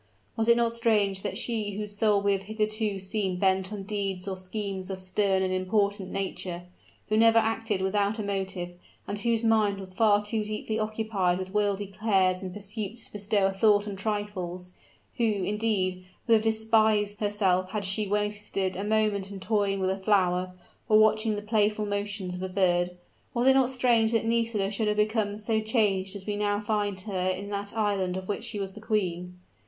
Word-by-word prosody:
Was 225 -1 0
it 235 0 +6
not 235 -1 +2
strange 210 -4 +1
that 205 - -3
she 215 -4 -2
whose 210 0 -5
soul 205 -1 +2
we 200 - +3
have 195 -1 0
hitherto 215 -1 -1
seen 190 -1 -2
bent 190 +1 +1
on 205 -2 -5
deeds 195 -2 -3
or 190 - -2
schemes 190 0 -4
of 190 - -3
stern 190 +1 +1
and 185 0 0
important 200 +1 0
nature 185 -2 -4 0.5
who 215 - +2
never 225 0 +6
acted 225 -3 +1
without 200 +2 +1
a 215 - -3
motive, 190 -3 -3 0.4
and 205 - -3
whose 230 +1 +1
mind 215 -3 +3
was 190 -1 -9
far 210 0 +3
too 215 0 -1
deeply 215 +1 -3
occupied 215 -4 0
with 185 0 -6
worldly 205 -1 +1
cares 190 -2 +1
and 185 -1 -5
pursuits 210 +3 -4
to - - -8
bestow 205 -1 +1
a 195 - +1
thought 205 +1 +3
on 200 - -4
trifles 195 -3 -4 0.5
who, 240 - 0
indeed, 205 -2 0 0.2
would 230 - +4
have 220 - +5
despised 220 -1 +2
herself 195 -4 +1
had 205 0 -3
she 200 +2 0
wasted 205 -2 -1
a 195 - -3
moment 210 -2 +1
in 200 -1 -7
toying 200 -1 0
with 190 0 +1
a 190 - -3
flower, 185 -2 +1 0.3
or 215 - +6
watching 215 0 +3
the 205 - -5
playful 210 0 +1
motions 205 -2 -3
of 180 - -6
a 190 - -3
bird, 180 -2 +1 0.4
was 240 +1 +1
it 265 - +8
not 265 -2 +3
strange 240 -4 +3
that 225 -1 +1
Nisida 225 -3 +1
should 215 +1 -1
have 210 0 0
become 210 -1 +1
so 220 +1 0
changed 205 -4 +1
as 195 -1 -7
we 210 - -2
now 205 0 0
find 205 -2 -1
her 185 -2 -2
in 190 +2 -3
that 200 +1 -3
island 195 -4 0
of 190 0 -6
which 205 - -3
she 210 - -4
was 195 -1 -4
the 215 - -11
queen? 180 -5 -2
205 Hz, 195 wpm, -27 LUFS, 190-215 Hz, 0.5 s, it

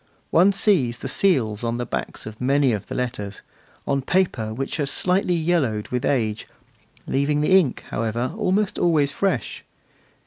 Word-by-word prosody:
One 180 +5 +5
still 195 - -2
sees 120 -9 0
the - - -6
seals 120 - +1
on 115 0 -1
the 120 - -3
backs - - -4
of 110 +1 -9
many 135 0 +3
of 105 - -4
the - - -6
letters, 110 -5 -4 0.4
on 140 0 0
paper 135 -8 0
which 135 +7 -4
has 145 -3 -1
slightly 180 +1 +1
yellowed 155 -11 0
with 125 0 -2
age, 110 -6 0 0.6
leaving 145 +2 0
the 185 +5 +4
ink, 145 -9 -2
however, 115 +5 -2
almost 210 -1 0
always 155 -5 +2
fresh. 195 +6 -2
135 Hz, 165 wpm, -23 LUFS, 115-175 Hz, 0.6 s, One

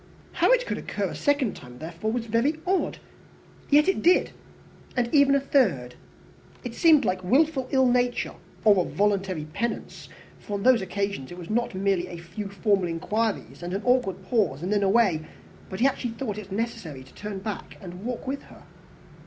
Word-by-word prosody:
How - - +2
it - - +4
could - - -3
occur - - -3
a - - -6
second 285 -7 +1
time, 125 -2 -12
therefore, 170 +8 -4
was 235 0 -2
very 235 +8 +1
odd! 375 +1 0 0.7
Yet 295 +3 +5
it 385 - +1
did, 355 +2 +4 0.7
and 240 -1 0
even 280 -2 +6
the 280 - +4
third. 195 - +1 0.7
It 245 -3 -5
seemed 315 +1 +5
like 185 0 -1
wilful 265 - +2
ill 265 -1 +3
nature, 245 0 +1 0.3
or 200 -4 +6
a - - -7
voluntary 190 -5 0
penance; 235 +5 -4 0.3
for 205 - -5
on 200 - -3
these 255 -2 +5
occasions 195 -6 -3
it 175 - -8
was 180 +2 -7
not 235 -2 0
merely 190 -2 +1
a 175 -1 -8
few 175 +5 -7
formal 200 -2 +1
inquiries 210 +7 -2
and 175 +2 -4
an 200 - -3
awkward 220 -7 +1
pause 190 - 0
and 190 +4 0
then 205 - +2
away, 195 -5 +3 0.5
but 190 - -6
he - - +5
actually 250 -3 0
thought 220 -5 -4
it 200 -2 -10
necessary 190 - -4
to 130 - -18
turn 210 -1 -6
back 200 +2 -6
and 180 +1 -9
walk 245 +2 -4
with 275 +2 -3
her. - - -16
210 Hz, 185 wpm, -26 LUFS, 185-250 Hz, 0.7 s, even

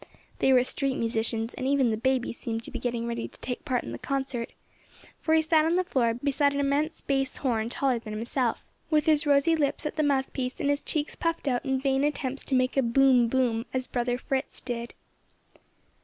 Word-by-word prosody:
They 265 - +4
were 250 -1 +6
street 270 +1 -1
musicians, 225 0 -1
and 260 - -3
even 270 -4 +3
the - - +1
baby 255 +2 0
seemed 230 -1 -4
to - - -6
be - - -4
getting 235 -1 -2
ready 235 0 -3
to - - -19
take 245 -1 -5
part 255 -5 -1
in - - -7
the 120 - -6
concert, 265 -4 -3 0.7
for 320 0 +2
he 320 - +4
sat 315 -1 +4
on 325 +2 +2
the 370 - +2
floor 240 -10 +1
beside 280 +2 +1
an - - 0
immense 285 +3 0
bass 270 -1 -1
horn 230 -4 0
taller 255 -1 0
than 220 -2 -9
himself, 235 +2 -1 0.2
with 305 -2 +3
his 310 -1 +3
rosy 285 +3 +4
lips 295 -1 0
at 300 - -3
the - - +3
mouth 275 -3 +1
piece 255 -1 -3
and 285 - +1
his 285 - 0
cheeks 300 -1 -2
puffed 330 -2 -2
out 245 -2 +1
in 265 -1 +1
vain 270 0 +1
attempts 280 -2 -2
to 270 - 0
make 255 +1 +1
a - - +6
"boom! 250 0 +4
boom!" 235 -2 0
as 255 0 0
brother 245 -1 -1
Fritz 265 +1 -3
did. 240 -1 -5
265 Hz, 215 wpm, -27 LUFS, 240-285 Hz, 0.7 s, were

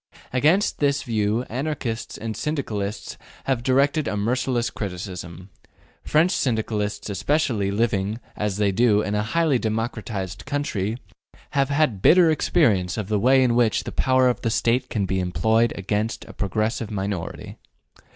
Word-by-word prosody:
Against 155 +10 +2
this 145 -1 +1
view, 110 0 0
Anarchists 125 -3 -4
and 110 -1 -5
Syndicalists 110 -6 -3 0.2
have 130 -3 0
directed 140 +4 +2
a 105 - -1
merciless 120 +3 0
criticism. 90 -2 -6 0.5
French 160 +4 +3
Syndicalists 110 - -1
especially, 110 -1 0
living, 105 0 0 0.2
as 105 -2 -2
they 105 -1 +2
do, 105 0 +3
in 105 - -2
a 105 - +1
highly 145 +4 +1
democratized 110 -4 -3
country, 115 -7 -2 0.5
have 140 -1 +1
had 140 -9 +1
bitter 170 - +6
experience 110 - +2
of 105 -2 -4
the 105 -1 +1
way 130 +4 +5
in 120 -2 +2
which 115 -2 +2
the - - -6
power 130 0 +3
of 125 - 0
the 115 - 0
State 120 +3 +1
can 105 -3 -1
be 95 0 -1
employed 110 +7 +2
against 105 +3 -2
a - - -11
progressive 110 +2 -2
minority. 95 -4 -4
110 Hz, 145 wpm, -23 LUFS, 100-130 Hz, 0.5 s, bitter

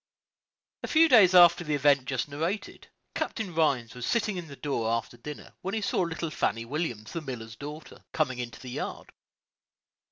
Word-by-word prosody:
A - - -4
few 325 +1 +5
days 205 - +7
after 175 -1 +7
the 150 -3 -1
event 140 -2 +3
just 130 -2 -2
narrated, 165 +8 -4 0.3
Captain 200 -6 -3
Rhines 135 -8 +1
was 125 -1 -8
sitting 215 -3 +1
in 175 -2 -5
the 140 - -10
door 135 -6 -2
after 115 +1 -2
dinner, 145 +5 -9
when 190 +3 -3
he 220 - -1
saw - - 0
little 165 -2 -2
Fannie 115 -5 -1
Williams, 120 -5 -4
the 165 - -4
miller's 115 -6 -7
daughter, 150 +6 -9
coming 130 -6 -1
into 120 -1 -6
the 125 - -8
yard. - - -5
150 Hz, 180 wpm, -28 LUFS, 125-175 Hz, 0.3 s, days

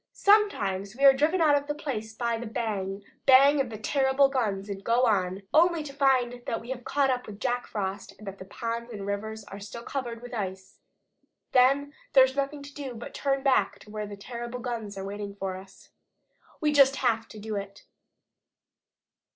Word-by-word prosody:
Sometimes 205 - +2
we 275 +2 +2
are 275 - +10
driven 310 +6 +2
out 300 -3 +5
of 285 0 -1
a 295 - -1
place 230 -8 -4
by 235 +1 -1
the 235 +1 -5
bang, 205 -4 -3 0.2
bang 275 +2 +7
of 265 - -3
the 220 - -6
terrible 265 +4 +3
guns 210 -7 -1
and 200 -1 -6
go 235 +4 +3
on, 195 -3 0
only 335 0 +4
to 280 -2 -8
find 255 -3 +2
that 230 - -1
we 235 +3 -8
have 245 -1 -5
caught 275 0 +1
up 250 -1 -2
with 205 -1 -9
Jack 245 +1 -1
Frost, 195 -1 -4
and 215 - -13
that 195 0 -7
the 190 - -8
ponds 230 +4 -4
and 215 -4 -7
the - - -5
rivers 215 +2 -4
are 200 0 -10
still 210 +4 -8
covered 240 -4 -5
with 245 - -9
ice. 190 -3 -5 0.7
Then 275 +3 +4 0.2
there 265 - +9
is 260 0 0
nothing 280 +1 -2
to 285 0 -11
do 270 -4 -6
but 230 - -8
to - - -8
turn 275 -1 +1
back 275 -2 +2
to 210 - -15
where 210 -1 -4
those 205 0 -8
terrible 235 +3 -6
guns 230 -5 -5
are 195 - -5
waiting 200 0 -6
for 195 -2 -4
us. 190 +1 -14 0.7
We 300 -1 +2
just 275 -2 +6
HAVE 230 -4 0
to 215 - -11
do 215 0 -5
it." 200 0 -6
235 Hz, 210 wpm, -27 LUFS, 205-275 Hz, 0.7 s, are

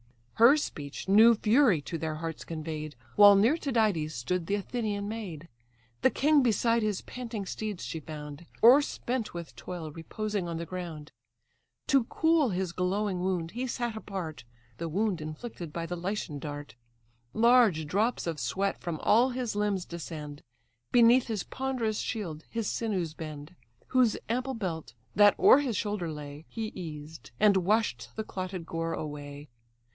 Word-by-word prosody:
Her 240 +6 +7
speech 145 - -5
new 220 +4 +7
fury 220 - +4
to 165 +3 -5
their 160 -1 -2
hearts 165 0 -5
convey'd; 155 -2 -5 0.2
While 205 -1 +9
near 225 +9 +4
Tydides 215 - 0
stood 165 +8 -2
the 200 - +1
Athenian 205 -1 -3
maid; 190 -8 -6 0.5
The - - +5
king 295 0 +3
beside 230 -1 +2
his 210 -3 -1
panting 230 -5 -6
steeds 210 -1 -4
she 160 - -4
found, 150 +1 -9 0.2
O'erspent 250 -3 +4
with 170 -1 -7
toil 170 -4 -6
reposing 200 +4 -4
on 170 -1 -3
the 170 - -4
ground; 165 -4 -7 0.8
To 270 -4 +4
cool 320 0 +2
his 185 -2 -2
glowing 185 +2 -1
wound 180 -2 -1
he 250 +3 -3
sat 240 -2 -2
apart, 190 -7 -6 0.4
(The 165 0 -3
wound 190 0 0
inflicted 155 +2 -7
by 165 +1 -4
the 175 +1 -4
Lycian 175 -4 -3
dart.) 145 0 -7 0.6
Large 230 -9 +5
drops 210 +10 0
of 165 -3 -3
sweat 190 +11 -1
from 170 -2 -4
all 235 +5 +4
his 245 -4 -3
limbs 205 -3 0
descend, 150 -4 -7 0.5
Beneath 240 +1 +6
his 215 -5 -2
ponderous 250 -5 -2
shield 165 -8 -4
his 230 -3 -2
sinews 190 -8 -2
bend, 155 +1 -8 0.3
Whose 250 -4 +3
ample 255 +3 -1
belt, 165 - -4 0.2
that 205 +1 +6
o'er 270 - +8
his 255 -8 -1
shoulder 205 -6 -2
lay, 150 0 -8
He 220 -1 -4
eased; 155 -3 -8
and 205 -2 +5
wash'd 185 - +1
the 220 - -3
clotted 185 -4 -5
gore 165 0 -3
away. 145 -1 -6
190 Hz, 155 wpm, -29 LUFS, 160-225 Hz, 0.8 s, While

